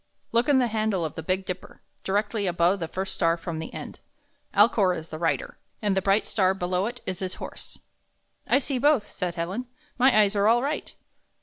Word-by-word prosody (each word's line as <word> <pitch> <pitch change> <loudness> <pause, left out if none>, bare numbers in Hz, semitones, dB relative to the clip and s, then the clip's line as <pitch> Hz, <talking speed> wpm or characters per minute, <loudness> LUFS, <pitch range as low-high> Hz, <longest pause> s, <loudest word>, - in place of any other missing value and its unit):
Look 235 +4 +2
in 285 - +5
the 255 - +4
handle 215 -6 0
of 155 - -4
the - - -5
Big 185 +4 -1
Dipper, 185 0 -6 0.2
directly 205 +1 0
above 175 +2 +2
the 165 - -3
first 190 +3 -4
star 165 -2 +2
from 165 -1 -5
the 160 - -6
end. - - -8 0.5
Alcor 200 -3 +4
is 160 0 -8
the 155 - -6
Rider, 165 -1 -1 0.2
and 205 -3 +1
the 190 - +2
bright 195 +2 +2
star 190 -3 +2
below 180 +1 0
it 245 +1 -7
is 185 -2 -3
his 185 -1 -4
Horse." - - -7 0.7
4 - - +4
"I - - +7
see 275 -2 -1
both," 280 -5 +3
said 180 -2 -3
Helen. 190 +9 -3 0.3
''My 260 +2 +6
eyes 205 0 +2
are 200 +1 +3
all 235 +2 +4
right." 295 +2 -3
195 Hz, 210 wpm, -26 LUFS, 180-225 Hz, 0.7 s, I